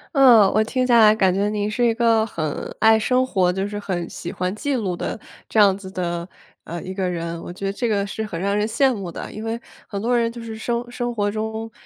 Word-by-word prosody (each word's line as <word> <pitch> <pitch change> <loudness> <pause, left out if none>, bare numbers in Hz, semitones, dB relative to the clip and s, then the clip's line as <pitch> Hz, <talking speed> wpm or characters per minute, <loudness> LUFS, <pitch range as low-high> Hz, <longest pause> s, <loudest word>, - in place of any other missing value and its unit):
嗯。 235 -8 +7
我 215 - +4
听 255 +3 -1
下 240 -2 +5
来 215 -1 +7
感 190 -4 +3
觉 200 +2 +1
你 210 0 -1
是 240 +3 +1
一 230 - +3
个 225 -2 +3
很 155 -8 -4
爱 220 0 +5
生 255 +3 +2
活 185 -7 +2
就 190 +1 -1
是 205 0 -5
很 175 -4 -3
喜 175 - -6
欢 185 +1 -2
记 280 +4 -1
录 195 -7 -1
的 - - -3 0.3
这 - - -4
样 200 -2 +5
子 190 -2 -9
的， 175 -2 -3 0.4
呃， 170 0 -6
一 185 - -6
个 190 -2 -1
人， 170 -1 -4
我 175 - -7
觉 195 +1 -6
得 195 - 0
这 235 +4 -2
个 200 -2 +1
是 220 +2 -4
很 170 -5 -5
让 200 +1 0
人 210 +1 +1
羡 260 +3 +2
慕 195 -5 -5
的。 - - -7
因 215 - -7
为 225 +1 -2 0.3
很 200 -2 -4
多 240 +2 +2
人 230 -1 +1
就 235 0 -9
是 220 -1 -7
生 240 +1 -3
生 240 -1 -3
活 205 -1 0
中， 220 +1 -4
210 Hz, 275 characters per minute, -22 LUFS, 190-230 Hz, 0.4 s, 嗯